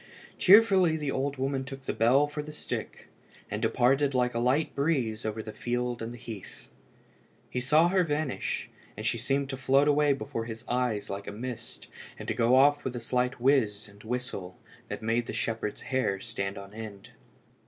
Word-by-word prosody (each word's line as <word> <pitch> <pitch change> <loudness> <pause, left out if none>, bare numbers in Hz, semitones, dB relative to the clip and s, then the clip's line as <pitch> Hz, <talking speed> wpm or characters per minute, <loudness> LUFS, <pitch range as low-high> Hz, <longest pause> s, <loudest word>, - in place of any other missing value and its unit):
Cheerfully 190 -5 +6
the 150 -3 -2
old 140 +1 -1
woman 135 0 -1
took 135 0 -9
the - - -1
bell 130 +6 +4
for 145 +1 -5
the 150 +1 -8
stick, 150 - -6 0.4
and - - -2
departed 135 +3 +2
like 125 -1 +2
a 115 - -1
light 130 +6 +1
breeze 130 -8 0
over 110 0 -3
the 110 - -7
field 120 0 -2
and 115 +1 -4
the 120 - -8
heath. 110 -5 -10 0.8
He 125 - -1
saw 155 +6 +4
her 185 0 +3
vanish, 150 -3 -2 0.3
and - - -5
she 115 - 0
seemed 135 +3 0
to 135 - -4
float 135 +2 +3
away 145 -1 +4
before 115 -4 -4
his 115 -1 -7
eyes 120 -5 -1
like 100 +1 -5
a - - -3
mist, 120 +3 -7 0.3
and - - -8
to - - 0
go 115 +2 +3
off 145 +2 +5
with 130 -1 -3
a - - -2
slight 125 +2 -1
whiz 115 -6 +2
and 100 0 -17
whistle 110 -6 -4 0.3
that - - -6
made 115 +1 0
the - - -4
shepherd's 110 -2 -2
hair 130 -7 0
stand 100 -3 -4
on 100 0 -9
end. 105 -3 -9
125 Hz, 190 wpm, -29 LUFS, 115-140 Hz, 0.8 s, Cheerfully